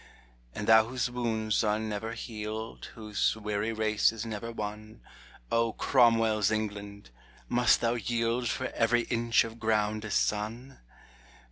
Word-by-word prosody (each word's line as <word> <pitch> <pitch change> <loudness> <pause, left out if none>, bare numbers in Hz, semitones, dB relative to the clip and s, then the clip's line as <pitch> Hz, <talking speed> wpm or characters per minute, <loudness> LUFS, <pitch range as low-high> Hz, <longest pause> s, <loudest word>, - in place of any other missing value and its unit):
And 105 - -4
thou 110 0 +6
whose 125 0 -2
wounds 110 -3 0
are 105 -1 +2
never 110 +1 -4
healed, 110 -1 -6
Whose 105 -2 0
weary 105 0 -2
race 110 -1 +2
is 115 0 -6
never 115 +1 -5
won, 110 0 -6 0.5
O 115 -1 +2
Cromwell's 115 -5 +3
England! 105 - -4 0.4
must 120 0 +3
thou 115 0 +2
yield 115 +1 -1
For 130 -1 -2
every 120 +1 +2
inch 115 0 +2
of 115 0 -8
ground 110 -1 0
a 110 - -5
son 110 +6 -2
110 Hz, 135 wpm, -29 LUFS, 105-115 Hz, 0.5 s, thou